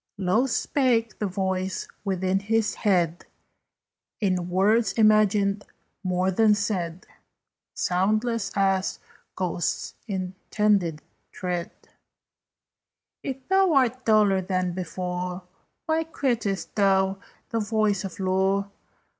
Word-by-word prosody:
Low 195 Hz, +7 st, +2 dB
spake 240 Hz, -3 st, +1 dB
the 210 Hz, -, 0 dB
voice 190 Hz, 0 st, -2 dB, 0.2 s
within 190 Hz, -1 st, 0 dB
his 215 Hz, +2 st, 0 dB
head, 175 Hz, -5 st, 0 dB, 0.9 s
In 185 Hz, -4 st, 0 dB
words 205 Hz, +4 st, +3 dB
imagined 210 Hz, -2 st, +3 dB, 0.4 s
more 185 Hz, 0 st, +1 dB
than 210 Hz, +2 st, +4 dB
said, 185 Hz, -4 st, -2 dB, 0.7 s
Soundless 215 Hz, +5 st, 0 dB
as 195 Hz, -1 st, +1 dB, 0.4 s
ghost's 175 Hz, -3 st, -2 dB
intended 190 Hz, -3 st, 0 dB, 0.3 s
tread: 180 Hz, +1 st, -3 dB, 1.5 s
"If 265 Hz, -1 st, -6 dB
thou 385 Hz, -2 st, +4 dB
art 255 Hz, -2 st, +2 dB
duller 210 Hz, -4 st, +4 dB
than 185 Hz, -1 st, -1 dB
before, 180 Hz, 0 st, -4 dB, 0.4 s
Why 320 Hz, 0 st, +1 dB
quittedst 240 Hz, -11 st, -2 dB
thou 195 Hz, -1 st, +2 dB, 0.3 s
the 230 Hz, -, -1 dB
voice 210 Hz, -2 st, +1 dB
of 195 Hz, -1 st, -7 dB
lore? 190 Hz, +1 st, +1 dB
195 Hz, 95 wpm, -25 LUFS, 185-220 Hz, 1.5 s, than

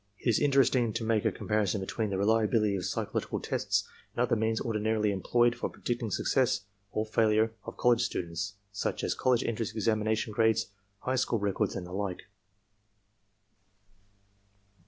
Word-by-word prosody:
" 100 Hz, -, -44 dB
It -, -, -6 dB
is 115 Hz, -, +4 dB
interesting 135 Hz, -5 st, +3 dB
to 115 Hz, -, -2 dB
make 110 Hz, -1 st, +1 dB
a -, -, +3 dB
comparison 105 Hz, -2 st, 0 dB
between 105 Hz, +3 st, -2 dB
the 95 Hz, -, -1 dB
reliability 105 Hz, 0 st, +2 dB
of 90 Hz, -, -3 dB
psychological -, -, -2 dB
tests -, -, -1 dB, 0.3 s
and 120 Hz, -, +2 dB
other 120 Hz, -, +2 dB
means 110 Hz, 0 st, 0 dB
ordinarily 110 Hz, -1 st, 0 dB
employed 120 Hz, +5 st, +2 dB
for 120 Hz, -, -3 dB
predicting 120 Hz, -2 st, -3 dB
success 120 Hz, +1 st, +1 dB, 0.3 s
or 110 Hz, -, -1 dB
failure 110 Hz, 0 st, +2 dB
of -, -, -8 dB
college 120 Hz, -1 st, +4 dB
students, 95 Hz, -2 st, -3 dB, 0.2 s
such 100 Hz, -, -2 dB
as -, -, +1 dB
college 125 Hz, -2 st, +2 dB
entrance 115 Hz, -1 st, -2 dB
examination 110 Hz, 0 st, 0 dB
grades, 110 Hz, -2 st, +2 dB, 0.3 s
high 130 Hz, +1 st, -1 dB
school 120 Hz, -2 st, +1 dB
records 100 Hz, -2 st, -1 dB
and 90 Hz, -, -4 dB
the 90 Hz, -, -10 dB
like. 95 Hz, -2 st, -3 dB
110 Hz, 155 wpm, -30 LUFS, 100-115 Hz, 0.3 s, is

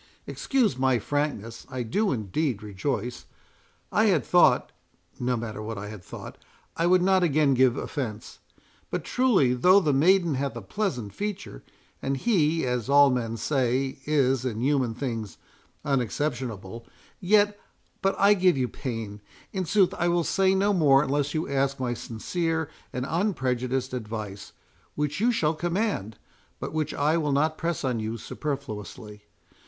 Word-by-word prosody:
"Excuse 235 Hz, -, 0 dB
my 130 Hz, -1 st, +3 dB
frankness—I 125 Hz, -1 st, -3 dB
do 200 Hz, -, 0 dB
indeed 115 Hz, -, -2 dB
rejoice; 115 Hz, +4 st, -3 dB, 0.6 s
I -, -, +3 dB
had -, -, +2 dB
thought—no 125 Hz, 0 st, +1 dB
matter 110 Hz, -2 st, -5 dB
what 110 Hz, 0 st, -5 dB
I 105 Hz, +1 st, -6 dB
had 105 Hz, -4 st, -9 dB
thought; -, -, -10 dB, 0.4 s
I 170 Hz, -, +1 dB
would 180 Hz, 0 st, +4 dB
not 190 Hz, 0 st, +4 dB
again 155 Hz, -4 st, +3 dB
give 130 Hz, 0 st, +3 dB
offence. 115 Hz, -8 st, -5 dB, 0.5 s
But -, -, -3 dB
truly 220 Hz, -, +3 dB
though 180 Hz, +10 st, +5 dB
the 155 Hz, -7 st, +1 dB
maiden 170 Hz, +3 st, +4 dB
hath 140 Hz, 0 st, -2 dB
a 120 Hz, -, -5 dB
pleasant 125 Hz, -, -3 dB
feature, 205 Hz, -, -5 dB, 0.4 s
and 135 Hz, 0 st, -1 dB
he, 165 Hz, -, +2 dB
as 125 Hz, -1 st, -2 dB
all 140 Hz, -1 st, +6 dB
men 115 Hz, -2 st, -2 dB
say, 130 Hz, +2 st, 0 dB
is 135 Hz, -4 st, +2 dB
in 115 Hz, -4 st, -3 dB
human 130 Hz, -4 st, +1 dB
things 115 Hz, -5 st, -4 dB, 0.5 s
unexceptionable, 120 Hz, -5 st, -2 dB, 0.3 s
yet—but 205 Hz, 0 st, 0 dB
I 200 Hz, +1 st, +6 dB
give 185 Hz, -5 st, +3 dB
you 125 Hz, -2 st, 0 dB
pain—in 115 Hz, -, -6 dB
sooth, 195 Hz, +1 st, +3 dB
I 175 Hz, -, +2 dB
will 175 Hz, 0 st, +2 dB
say 190 Hz, +3 st, +2 dB
no 200 Hz, +2 st, +2 dB
more 145 Hz, -6 st, +5 dB
unless 145 Hz, +1 st, -1 dB
you 155 Hz, -, -1 dB
ask 135 Hz, 0 st, 0 dB
my 125 Hz, -2 st, -1 dB
sincere 160 Hz, +8 st, -3 dB, 0.2 s
and 125 Hz, 0 st, -3 dB
unprejudiced 130 Hz, -, -1 dB
advice, 105 Hz, -4 st, -6 dB, 0.4 s
which 150 Hz, +3 st, -2 dB
you 235 Hz, +4 st, +3 dB
shall 160 Hz, -9 st, +1 dB
command, 170 Hz, -, -2 dB, 0.4 s
but -, -, -5 dB
which 155 Hz, -1 st, -1 dB
I 150 Hz, +3 st, +1 dB
will 150 Hz, -3 st, 0 dB
not 155 Hz, +3 st, +2 dB
press 165 Hz, -1 st, -2 dB
on 125 Hz, -4 st, 0 dB
you 110 Hz, +1 st, -3 dB
superfluously. 105 Hz, -6 st, -6 dB
135 Hz, 145 wpm, -26 LUFS, 120-170 Hz, 0.6 s, all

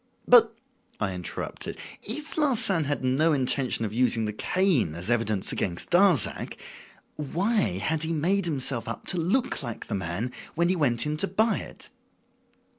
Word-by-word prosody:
"But," 230 Hz, -2 st, +6 dB, 0.4 s
I 95 Hz, -3 st, -2 dB
interrupted, 90 Hz, -1 st, -6 dB, 0.2 s
"if 295 Hz, +8 st, -6 dB
Larsan 230 Hz, -, +3 dB
had 145 Hz, -1 st, -3 dB
no 145 Hz, +6 st, +2 dB
intention 130 Hz, -3 st, 0 dB
of 105 Hz, -, -5 dB
using 115 Hz, -2 st, +1 dB
the 105 Hz, -, -3 dB
cane 165 Hz, -, 0 dB
as 90 Hz, +7 st, -3 dB
evidence 110 Hz, -4 st, 0 dB
against 85 Hz, -3 st, -3 dB
Darzac, 175 Hz, -, +3 dB, 0.6 s
why 160 Hz, -, 0 dB
had 155 Hz, +10 st, -1 dB
he 160 Hz, 0 st, +2 dB
made 175 Hz, +5 st, 0 dB
himself 135 Hz, -6 st, +1 dB
up -, -, -6 dB
to 185 Hz, -, +1 dB
look 205 Hz, +11 st, 0 dB
like 115 Hz, -2 st, -6 dB
the -, -, -6 dB
man 100 Hz, +5 st, -3 dB, 0.2 s
when 170 Hz, +2 st, +2 dB
he 185 Hz, -, +2 dB
went 120 Hz, -7 st, +3 dB
in 150 Hz, 0 st, -2 dB
to -, -, +4 dB
buy 220 Hz, +5 st, +1 dB
it?" -, -, -11 dB
145 Hz, 160 wpm, -26 LUFS, 115-185 Hz, 0.6 s, But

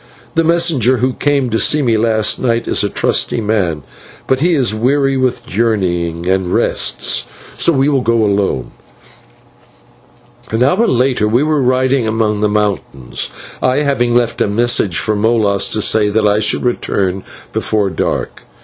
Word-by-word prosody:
The 165 Hz, -, +2 dB
messenger 165 Hz, -7 st, +2 dB
who 125 Hz, +2 st, 0 dB
came 140 Hz, -4 st, 0 dB
to 110 Hz, -, 0 dB
see 150 Hz, -1 st, +2 dB
me 115 Hz, -3 st, +2 dB
last 110 Hz, -1 st, +1 dB
night 115 Hz, -2 st, -1 dB
is -, -, +1 dB
a -, -, 0 dB
trusty -, -, 0 dB
man, 100 Hz, -9 st, -1 dB, 0.4 s
but 130 Hz, -, 0 dB
he 170 Hz, +3 st, +2 dB
is 130 Hz, -6 st, +1 dB
weary 135 Hz, +5 st, +1 dB
with 130 Hz, -1 st, -1 dB
journeying, 90 Hz, -6 st, -1 dB
and 95 Hz, -1 st, 0 dB
rests, -, -, 0 dB, 0.3 s
so 170 Hz, -, +3 dB
we 135 Hz, -2 st, +1 dB
will 140 Hz, -3 st, +1 dB
go 115 Hz, -1 st, +1 dB
alone." 100 Hz, -10 st, -1 dB, 1.8 s
An 110 Hz, +2 st, 0 dB
hour 185 Hz, -, +2 dB
later 125 Hz, -3 st, +1 dB
we 120 Hz, +6 st, +2 dB
were 155 Hz, -1 st, +1 dB
riding 130 Hz, -1 st, +1 dB
among 110 Hz, -1 st, 0 dB
the 105 Hz, -, +2 dB
mountains, 100 Hz, -11 st, -3 dB, 0.3 s
I 130 Hz, +3 st, +1 dB
having 120 Hz, -4 st, 0 dB
left 120 Hz, -1 st, 0 dB
a -, -, +2 dB
message 105 Hz, -4 st, +1 dB
for 110 Hz, -, 0 dB
Molas 105 Hz, -2 st, +1 dB
to 110 Hz, -, 0 dB
say 105 Hz, -2 st, +2 dB
that 105 Hz, +1 st, +1 dB
I 105 Hz, 0 st, +3 dB
should 110 Hz, -, 0 dB
return 95 Hz, -6 st, -1 dB, 0.3 s
before 105 Hz, -3 st, -1 dB
dark. 80 Hz, -, -3 dB
115 Hz, 160 wpm, -15 LUFS, 105-130 Hz, 1.8 s, so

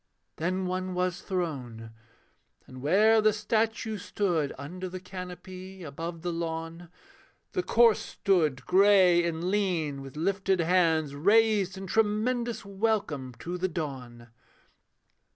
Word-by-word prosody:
Then 185 Hz, +3 st, -1 dB
one 185 Hz, 0 st, -3 dB
was 180 Hz, -1 st, -1 dB
thrown: 130 Hz, -, -4 dB, 0.7 s
and 130 Hz, 0 st, -11 dB
where 215 Hz, +9 st, +4 dB
the 215 Hz, 0 st, +4 dB
statue 220 Hz, 0 st, -1 dB
stood 175 Hz, -7 st, -1 dB
Under 180 Hz, +7 st, -6 dB
the 185 Hz, +1 st, -6 dB
canopy, 185 Hz, 0 st, -9 dB
above 165 Hz, +3 st, -6 dB
the 175 Hz, -1 st, -2 dB
lawn, 165 Hz, 0 st, -5 dB, 0.6 s
The 370 Hz, -, 0 dB
corse 235 Hz, -9 st, +4 dB
stood; 155 Hz, -10 st, 0 dB
grey 185 Hz, -2 st, +5 dB
and 170 Hz, +2 st, -2 dB
lean, 170 Hz, -9 st, 0 dB
with 135 Hz, +1 st, -10 dB
lifted 190 Hz, +2 st, 0 dB
hands 165 Hz, -4 st, +2 dB
Raised 200 Hz, +3 st, +3 dB
in 195 Hz, -, -6 dB
tremendous 225 Hz, +3 st, 0 dB
welcome 195 Hz, -, -1 dB
to 180 Hz, +1 st, -4 dB
the 185 Hz, -, +1 dB
dawn. 130 Hz, -8 st, -6 dB
180 Hz, 120 wpm, -28 LUFS, 160-200 Hz, 0.7 s, grey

